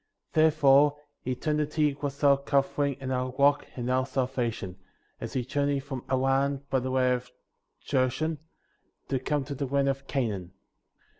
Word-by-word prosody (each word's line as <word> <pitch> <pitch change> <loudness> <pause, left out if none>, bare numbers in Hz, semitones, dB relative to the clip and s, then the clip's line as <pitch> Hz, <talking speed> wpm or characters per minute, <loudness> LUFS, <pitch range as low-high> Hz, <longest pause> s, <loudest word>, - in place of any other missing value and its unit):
Therefore, 145 -2 +5 0.3
eternity 150 +3 0
was 140 0 -4
our 140 -1 +7
covering 140 0 0
and 130 -1 -3
our 130 0 -1
rock 145 +1 +3
and 120 -1 -4
our 130 +1 +1
salvation, 125 -8 -2 0.4
as - - -6
we 125 -2 0
journeyed 140 +1 0
from 135 -3 -6
Haran 135 +1 +1
by 130 - +3
the 130 +1 -3
way 130 -1 +3
of 125 0 -4 0.6
Jershon, 140 +4 0 0.7
to 135 - 0
come 145 +2 -1
to 140 +2 -6
the 140 0 -3
land 140 +1 +1
of 135 0 -3
Canaan. 100 -9 -2
135 Hz, 150 wpm, -28 LUFS, 130-145 Hz, 0.7 s, our